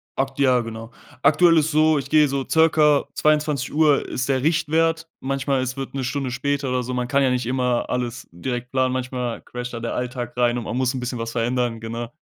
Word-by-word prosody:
ak 135 0 -2
ja, 130 -3 +4
genau. 115 0 -8 0.3
Aktuell 170 -2 +5
ist 155 +1 +2
so, 155 0 +4
ich 140 - -4
gehe 150 -1 +5
so 135 -1 -2
circa 155 -3 +4
22:00 150 -1 +2
ist 130 +2 -3
der 130 -1 +1
Richtwert. 165 +1 +1
Manchmal, 135 0 -1
es 130 +1 -3
wird 135 - -5
'ne 135 -1 -3
Stunde 130 0 -2
später 140 +2 -1
oder 125 0 0
so. 125 +1 -4
Man 125 -1 -2
kann 140 +1 +2
ja 130 - +3
nicht 125 -1 -1
immer 125 -1 0
alles 125 0 -3
direkt 120 +7 -5
planen. 130 -1 +1
Manchmal 125 -2 -3
crasht 125 0 -7
da 115 - -4
der 115 0 -4
Alltag 125 -1 -4
rein 120 -1 +2
und 120 - -3
man 120 - -3
muss 130 0 +1
'n 130 - -3
bisschen 125 0 -4
was 115 0 -4
verändern, 120 0 -1
genau. 115 +1 -5
130 Hz, 215 wpm, -22 LUFS, 125-145 Hz, 0.3 s, Aktuell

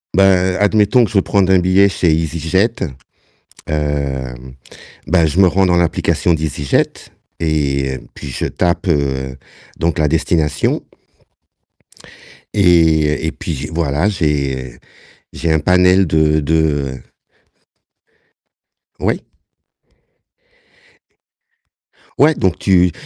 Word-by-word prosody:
Ben, 95 -1 +3
admettons 105 +3 +3
que - - -7
je - - -9
veux - - +5
prendre 95 -1 +1
un 95 - +5
billet 95 +2 +4
chez 90 -3 0
EasyJet, 80 +7 0 1.0
heu, 75 -3 -2 0.8
bah, 85 -1 +3
je 80 +5 -1
me 95 - +6
rends 95 +2 +2
dans 90 - +2
l'application 85 0 +1
d'EasyJet 75 -3 -1 0.5
et 70 -5 -1 0.2
puis 70 - -8
je - - -3
tape, 90 +1 -1
heu, 65 -4 -1 0.4
donc 85 0 -1
la 75 - +2
destination 80 -1 0 1.7
et 80 -5 +3
et 80 - -1
puis 75 -3 -5
voilà, 80 +3 0
j'ai 70 - -2 0.5
j'ai 85 -1 -2
un 80 - +2
panel 90 +3 +3
de 80 0 +2
de 75 -3 0 2.0
Oui. - - -1 2.9
Ouais, 150 +3 +5
donc 95 - -1
tu 90 -2 +3
80 Hz, 105 wpm, -16 LUFS, 75-90 Hz, 2.9 s, me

